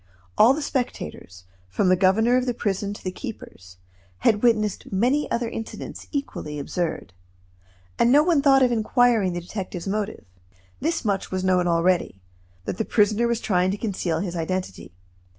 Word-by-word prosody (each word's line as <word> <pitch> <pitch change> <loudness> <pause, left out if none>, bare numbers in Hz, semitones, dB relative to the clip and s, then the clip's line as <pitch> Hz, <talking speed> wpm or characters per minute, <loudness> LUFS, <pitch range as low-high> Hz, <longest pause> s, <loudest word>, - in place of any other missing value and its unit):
All 245 +5 +6
the 305 - -4
spectators, 90 - -4 0.3
from 95 - +1
the 185 - +5
governor 205 +6 +3
of 255 0 +1
the 245 - -1
prison 200 -2 -2
to - - -12
the 185 - -3
keepers, 95 - -10 0.4
had 210 -2 +3
witnessed 215 -4 +1
many 250 +10 +1
other 235 0 -1
incidents 225 -1 -7
equally 275 - -4
absurd; 160 - -3 0.9
and 235 - +4
no 290 +3 +6
one 330 -4 +3
thought 270 -2 +5
of 250 - +3
inquiring 225 -4 +2
the 175 - -4
detective's 180 0 -6
motive. 210 +1 -3 0.5
This 325 -2 -1
much 200 -2 -1
was 185 0 -3
known 180 -1 +2
already; 170 - +1 0.5
that - - -4
the - - +2
prisoner 215 +2 +2
was 235 -1 0
trying 185 -5 +1
to 195 - -2
conceal 185 -6 -2
his 180 -3 -4
identity. 170 - -4
205 Hz, 165 wpm, -24 LUFS, 180-240 Hz, 0.9 s, All